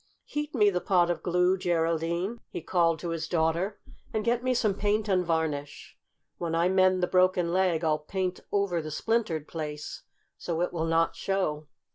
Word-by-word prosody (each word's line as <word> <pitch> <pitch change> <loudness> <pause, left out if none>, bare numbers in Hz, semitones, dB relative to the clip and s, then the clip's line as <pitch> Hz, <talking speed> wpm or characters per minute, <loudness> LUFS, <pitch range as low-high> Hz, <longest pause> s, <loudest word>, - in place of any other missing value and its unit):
"Heat 295 0 -4
me 210 -4 +5
the 180 -1 -1
pot 175 -2 +3
of 175 - -3
glue, 180 +1 +2
Geraldine," 170 +4 0
he - - -5
called 165 -1 +2
to 170 - -3
his 165 -1 -3
daughter, 170 +4 0 0.3
"and 215 -1 -2
get 240 +1 +1
me 255 0 +1
some 215 -4 +2
paint 210 +2 0
and 185 -2 +2
varnish. 160 -4 -2 0.4
When 165 -2 -2
I 170 +2 +3
mend 185 -1 +3
the - - +3
broken 180 -2 +2
leg 180 -3 +2
I'll 155 -1 +2
paint 185 +4 -3
over 200 -4 +1
the 155 - -6
splintered 165 -3 -1
place, 150 -2 -6 0.4
so 170 -1 -2
it 180 - -1
will 165 -2 -1
not 165 0 +2
show." 155 -6 -1
175 Hz, 180 wpm, -28 LUFS, 165-195 Hz, 0.4 s, me